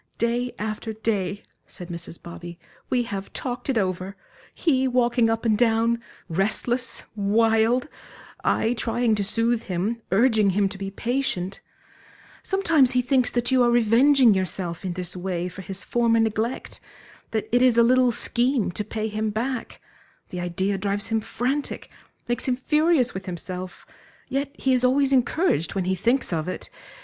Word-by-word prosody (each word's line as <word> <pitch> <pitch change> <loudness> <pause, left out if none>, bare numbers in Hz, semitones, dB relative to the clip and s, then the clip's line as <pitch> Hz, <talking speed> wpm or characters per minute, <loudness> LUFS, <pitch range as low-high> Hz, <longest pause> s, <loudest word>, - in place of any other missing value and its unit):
"Day 240 +2 0
after 215 +1 -4
day," 205 -3 -2 0.2
said 180 -2 -10
Mrs. 170 -1 -7
Bobby, 170 0 -9 0.3
"we 250 -1 +2
have 200 -3 -6
talked 250 +1 -4
it 260 - +1
over 185 -1 -1 0.4
he 265 -5 +1
walking 245 -2 +2
up 225 +1 -1
and 220 -2 +3
down, 230 +1 +2 0.3
restless, 220 +8 -1
wild; 225 +4 +2 0.6
I 225 - +2
trying 235 0 0
to 205 -1 0
soothe 230 +3 +1
him, 200 +6 -2
urging 215 0 +4
him 200 -1 +3
to 195 0 -9
be 195 0 -4
patient 230 -4 -2 0.8
Sometimes 330 - +3
he 250 0 +2
thinks 255 -1 +2
that 240 +1 0
you 260 -1 +4
are 240 - +4
revenging 240 +2 +5
yourself 185 -2 -3
in 185 -2 -2
this 180 0 -2
way 180 -1 -2
for 180 +2 -8
his 195 +1 -5
former 235 -1 +2
neglect, 225 +2 -1 0.5
that 220 -2 -2
it 245 - +4
is 250 -2 +4
a 235 - +7
little 250 +1 +4
scheme 240 -1 +1
to 210 - -3
pay 215 +1 -3
him 215 0 -2
back 235 +4 -3 0.5
the 180 - -5
idea 190 +3 -1
drives 200 +2 -1
him 225 -1 +1
frantic, 265 +6 -3 0.4
makes 240 +2 -2
him 255 - +2
furious 300 -1 +2
with 190 0 -7
himself, 180 +1 -6 0.4
yet 275 +1 -2
he 265 - +1
is 250 -1 +2
always 270 +2 +3
encouraged 255 - +1
when 190 -2 -1
he 190 - +1
thinks 235 +3 +1
of 160 0 -1
it. 185 - -6
225 Hz, 160 wpm, -24 LUFS, 195-250 Hz, 0.8 s, a